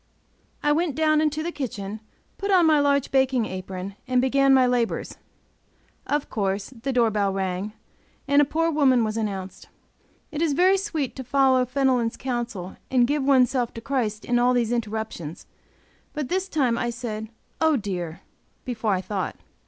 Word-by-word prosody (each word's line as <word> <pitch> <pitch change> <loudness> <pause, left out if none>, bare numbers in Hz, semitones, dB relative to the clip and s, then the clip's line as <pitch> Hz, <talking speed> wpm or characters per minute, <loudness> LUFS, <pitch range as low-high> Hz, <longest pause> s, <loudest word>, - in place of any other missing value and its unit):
I 295 - +3
went 310 -2 +1
down 310 0 +3
into 310 0 0
the 345 - -2
kitchen, 215 -8 -5 0.4
put 400 - -3
on 365 -3 +5
my 310 -2 +5
large 280 -1 +2
baking 265 -3 +2
apron, 185 0 -6
and 255 0 +2
began 275 +2 +3
my 260 -1 +6
labors; 245 -2 -1 0.9
of 295 0 0
course 195 0 -2
the 260 +2 -4
door 235 -3 +3
bell 200 -2 +1
rang, 190 +1 -3 0.5
and 285 +1 +5
a - - +4
poor 330 +3 0
woman 265 -6 +4
was 215 -1 -2
announced. 195 -4 -4 0.6
It 310 0 -3
is 325 -3 +2
very 370 +6 +4
sweet 310 -9 -3
to 260 - -5
follow 260 0 +3
Fenelon's 255 -3 +1
counsel 240 -8 -4
and 250 -2 +4
give 290 +2 0
oneself 255 -3 +3
to - - -5
Christ 225 -5 -2
in 240 0 +2
all 250 +1 +3
these 235 -2 +1
interruptions; 220 -8 -4 0.7
but 300 -4 -3
this 380 +1 -1
time 255 -8 +1
I 240 - -1
said, 220 -2 -5 0.3
"oh, 320 -1 +4
dear!" 180 -6 -4 0.4
before 225 -5 -1
I 185 - -2
thought. 190 -2 -3
250 Hz, 170 wpm, -24 LUFS, 215-285 Hz, 0.9 s, my